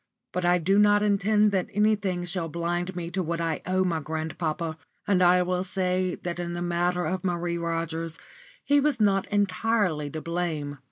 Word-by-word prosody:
But 180 -1 -2
I 175 0 +4
do 195 +4 +2
not 205 0 +5
intend 210 +1 +3
that 190 -2 0
anything 205 -4 +1
shall 175 -2 -3
blind 175 +2 -2
me 170 -1 -4
to 190 +1 -1
what 170 -1 -2
I 165 -2 -1
owe 185 0 +2
my 170 -3 0
grandpapa; 160 +1 -3 0.3
and 190 -2 +2
I 180 0 +5
will 180 0 -1
say 185 -1 -1
that 175 0 -3
in 175 0 -3
the 175 - -4
matter 175 +1 0
of 185 +1 -2
Marie 175 -1 -1
Rogers 165 -1 -3 0.5
he 285 0 +4
was 290 -3 +1
not 195 -2 +2
entirely 200 -5 +1
to 155 - -5
blame. 155 -4 -3
180 Hz, 180 wpm, -26 LUFS, 170-195 Hz, 0.5 s, not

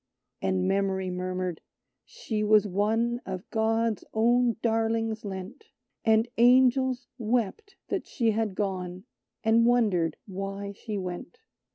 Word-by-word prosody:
And 95 -1 0
Memory 190 -1 0
murmured: 180 -1 -3 0.4
"She 225 - -4
was 210 0 +5
one 225 +5 0
Of 185 0 -6
God's 225 0 +1
own 240 +1 +3
darlings 225 -1 0
lent; 195 - -7 0.4
And 220 +1 +4
Angels 255 +1 +4
wept 245 - -1
that - - -2
she 230 -3 +1
had 215 -2 -1
gone, 185 -2 -3 0.4
And 230 +1 +4
wondered 200 -10 +2
why 195 +1 -5
she 210 +1 -6
went. 185 - -6
220 Hz, 120 wpm, -27 LUFS, 190-235 Hz, 0.4 s, was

